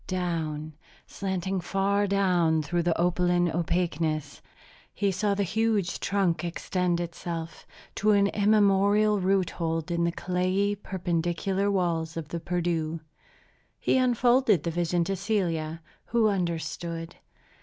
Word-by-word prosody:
Down, 160 -4 -2 0.3
slanting 190 -1 -3
far 200 +3 +1
down 180 -5 +2
through 175 +4 0
the 170 -1 0
opaline 175 0 +2
opaqueness, 160 -3 -1 0.5
he 200 -1 0
saw 200 +2 0
the 200 - 0
huge 210 -1 0
trunk 180 -5 0
extend 175 0 -1
itself, 170 -1 -6 0.3
to 215 - +2
an 200 -1 +5
immemorial 205 0 +3
root 190 -1 +1
hold 165 0 -2
in 170 0 +1
the 170 - +1
clayey, 185 +4 0
perpendicular 190 0 -1
walls 170 -4 -1
of 155 -3 -5
the 170 - -3
Perdu. 165 -2 -2 0.8
He - - +1
unfolded 245 - +3
the 170 - -1
vision 175 +1 0
to 195 +3 -2
Celia, 170 -6 -2 0.2
who 225 -2 +2
understood. 170 -2 -3
175 Hz, 125 wpm, -27 LUFS, 165-200 Hz, 0.8 s, an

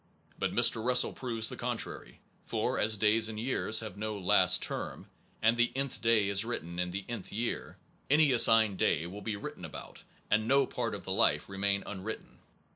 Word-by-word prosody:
But - - -1
Mr. 110 - +4
Russell 125 +1 +3
proves 115 -3 -2
the - - -6
contrary; - - -5 0.2
for, - - -2
as 110 0 +2
days 110 +2 +2
and 110 -1 -6
years 115 -2 0
have 105 -4 -8
no 110 0 -4
last 95 - +3
term, - - -5 0.4
and 115 +1 +4
the 120 0 +2
nth 135 -1 -3
day 115 -3 +3
is 100 0 +2
written 85 -7 -5
in 90 0 -1
the 95 +2 -6
nth 120 -5 -7
year, 115 +3 -4 0.3
any 150 0 +4
assigned 110 -5 +5
day 80 - +1
will 95 +4 -8
be 110 -1 -4
written 100 - -8
about, - - -9 0.3
and 110 +1 +2
no 140 +2 +3
part 115 -4 -4
of - - -9
the 95 - -6
life 95 - +2
remain 100 0 -1
unwritten. 105 +2 -8
110 Hz, 190 wpm, -30 LUFS, 100-115 Hz, 0.4 s, assigned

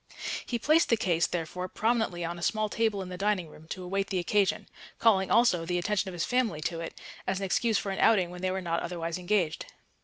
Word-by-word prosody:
He 240 - -1
placed 310 +7 +3
the 230 - +4
case, 170 -4 +2
therefore, 180 +2 -3
prominently 220 -5 0
on 170 +1 -4
a - - -9
small 215 +3 0
table 215 -3 0
in 185 - -8
the 180 0 -7
dining 195 -5 0
room 155 +1 -15
to 185 +2 -6
await 195 +2 -1
the 190 - -2
occasion; 195 +2 +1 0.3
calling 195 -4 +3
also 230 -8 +4
the 175 +1 -1
attention 195 +2 0
of - - -8
his 170 -1 -1
family 245 -10 +1
to 165 +1 -2
it, 165 - -7 0.3
as 190 - 0
an 195 - -2
excuse 220 +3 +2
for 195 - -2
an 190 - -4
outing 190 -6 +4
when 180 0 -8
they 185 - 0
were 190 +1 -2
not 170 -1 -1
otherwise 170 0 -3
engaged. 180 -4 0
185 Hz, 235 wpm, -29 LUFS, 175-210 Hz, 0.3 s, the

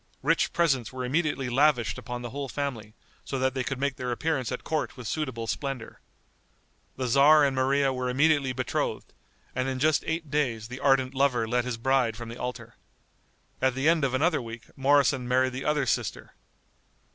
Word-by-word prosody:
Rich 165 +4 +2
presents 135 -10 +1
were 130 -1 -4
immediately 145 -1 0
lavished 125 -3 +2
upon 125 0 -6
the 120 - -6
whole 140 0 -5
family, 120 -7 -4 0.3
so 135 - -4
that 130 0 +1
they 130 -1 -1
could 130 +1 -4
make 140 -1 -1
their 125 -1 -3
appearance 135 -1 -1
at 125 - -4
court 155 -2 -2
with 125 -3 -7
suitable 130 -6 -3
splendor. 135 -1 -4 1.0
The 130 - -3
tzar 140 +5 +6
and 135 -1 0
Maria 135 +1 +2
were 125 0 -2
immediately 140 0 +3
betrothed, 130 0 -3 0.4
and 130 +1 -1
in 130 - -2
just 150 +3 +2
eight 160 -2 -3
days 120 -7 -1
the 125 +1 -7
ardent 135 -2 +2
lover 130 -4 +1
led 120 +1 0
his 125 -2 -3
bride 125 -2 +1
from 120 -1 -7
the 115 - -8
altar. 120 -2 -6 0.8
At 130 -1 +2
the 135 +3 0
end 165 -2 +4
of 130 -2 +1
another 155 +2 +2
week 115 0 -10
Moroson 135 -2 +3
married 130 +1 +2
the 130 - -5
other 150 -2 +1
sister. 120 -2 -2
130 Hz, 185 wpm, -27 LUFS, 125-140 Hz, 1.0 s, tzar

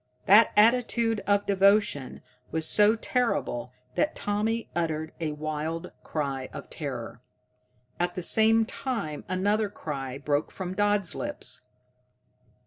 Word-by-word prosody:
That 210 +3 +7
attitude 230 0 +3
of 205 0 +3
devotion 195 -8 +2 0.3
was 160 0 -1
so 210 +1 +5
terrible 225 - -1 0.2
that 300 - 0
Tommy 220 +3 -1
uttered 160 -2 -1
a 155 -2 -2
wild 155 +3 -4
cry 135 -4 -3
of - - -9
terror. - - -6 0.8
At 175 0 0
the 180 - -4
same 225 +4 +4
time 225 - -4
another 205 +3 +1
cry 135 -8 -5
broke 145 +1 -1
from 185 -1 -5
Dodd's 205 -2 +1
lips. 290 - -4
195 Hz, 120 wpm, -27 LUFS, 155-220 Hz, 0.8 s, That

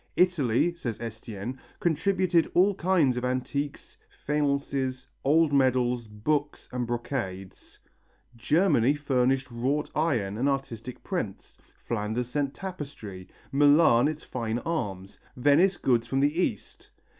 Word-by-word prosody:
Italy, 170 -4 +2
says 120 -10 -5
Estienne, 115 +1 -6 0.2
contributed 175 +1 +2
all 190 +3 +5
kinds 170 -9 +2
of 125 - -3
antiques, 130 +3 -3 0.3
faiences, 140 -3 -1 0.2
old 155 +2 +3
medals, 125 -3 +2
books 145 +8 -2
and 125 -1 -2
brocades; 115 -6 -5 0.6
Germany 145 - +3
furnished 135 -2 +1
wrought 135 +6 -1
iron 115 -10 0
and 135 +3 +2
artistic 125 -3 -4
prints, - - -5 0.3
Flanders 115 +2 -2
sent 140 +1 -1
tapestry, 140 - -7 0.2
Milan 145 -2 +5
its 155 0 -4
fine 115 -2 -3
arms, 100 - -4 0.2
Venice 150 +9 +4
goods 120 -2 +1
from 135 +2 0
the 145 +2 +2
East. - - -4
135 Hz, 115 wpm, -27 LUFS, 120-150 Hz, 0.6 s, all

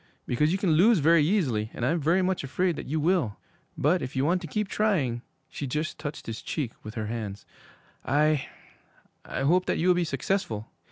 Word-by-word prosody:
Because 150 +6 +1
you 190 - +1
can 190 -3 +1
lose 195 +8 +5
very 160 0 +5
easily, 140 - +1
and 120 - -2
I'm 165 +6 +1
very 170 +5 +2
much 185 -2 0
afraid 175 +6 0
that - - -7
you 155 +4 -1
will. 160 - +1 0.4
But 175 +6 +2
if 130 - -5
you 130 +1 +1
want 175 +3 +2
to 170 - -6
keep 210 +6 -1
trying,' 160 - 0 0.3
she 140 - -5
just 150 +5 -3
touched 150 -1 -6
his 115 -1 -5
cheek 140 -8 -3
with 110 +1 -9
her 110 -2 -2
hands, 105 -3 -5 0.6
'I 150 -1 +2 0.8
I - - -4
hope 175 +7 +3
that - - +1
you 175 +3 +2
will - - +7
be 175 0 +1
successful!' 160 - -2
155 Hz, 205 wpm, -27 LUFS, 125-180 Hz, 0.8 s, will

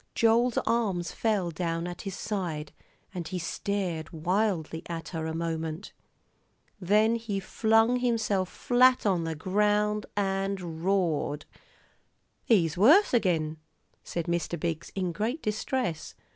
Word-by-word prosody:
Joel's 230 +1 +3
arms 210 -7 0
fell 205 -6 0
down 165 0 -2
at 175 0 -6
his 195 -2 -5
side, 170 -8 -3 0.4
and 175 -4 -5
he 185 - -4
stared 175 -2 -3
wildly 170 -1 -1
at 165 -1 -5
her 160 -2 -3
a 160 - -3
moment. 165 +1 -4 0.9
Then 210 +4 +3
he 225 -4 -2
flung 225 +4 +2
himself 220 -6 0
flat 255 0 +3
on 180 -5 +2
the 165 0 -3
ground 210 +5 +1
and 195 -4 -2
roared. 175 -6 0 1.0
"He's 170 -9 +3
worse 295 - +6
agin," 165 -9 +1 0.5
said 170 -2 -4
Mr. 170 0 -2
Biggs, 165 0 -3
in 185 -2 -1
great 225 - -2
distress. 210 - -2
190 Hz, 125 wpm, -28 LUFS, 165-215 Hz, 1.0 s, worse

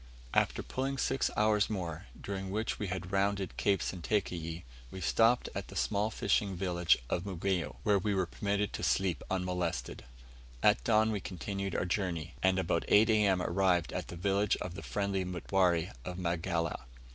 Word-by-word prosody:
After - - +2
pulling 135 +1 -2
six 135 0 +1
hours 105 -1 +3
more, 90 -4 -4
during 95 -1 -4
which 110 +3 -2
we 105 - -2
had 90 0 -4
rounded 100 -1 0
Cape 100 -1 +1
Sentakeyi, 85 -3 -2 0.3
we 95 - -8
stopped 115 +7 +3
at - - -4
the - - -11
small 105 +1 +1
fishing 100 -2 0
village 85 -4 +2
of 85 - -1
Mugeyo, 95 -3 -2
where 105 -2 +4
we 100 +1 0
were 95 -1 +2
permitted 100 +3 -1
to - - -4
sleep 95 -4 +1
unmolested. 90 -2 -2 0.6
At - - +4
dawn 110 0 +3
we 105 - -1
continued 100 +1 -4
our - - 0
journey, 85 -4 -2
and 95 0 +3
about 85 -2 +1
8 110 +2 +6
A.M. 100 -4 +3
arrived 90 -2 +2
at - - -3
the - - -7
village 100 +3 +1
of 90 - -5
the - - -7
friendly 100 -2 -1
Mutware 90 -2 +1
of 90 +4 -5
Magala. 85 -4 -1
95 Hz, 170 wpm, -32 LUFS, 90-100 Hz, 0.6 s, 8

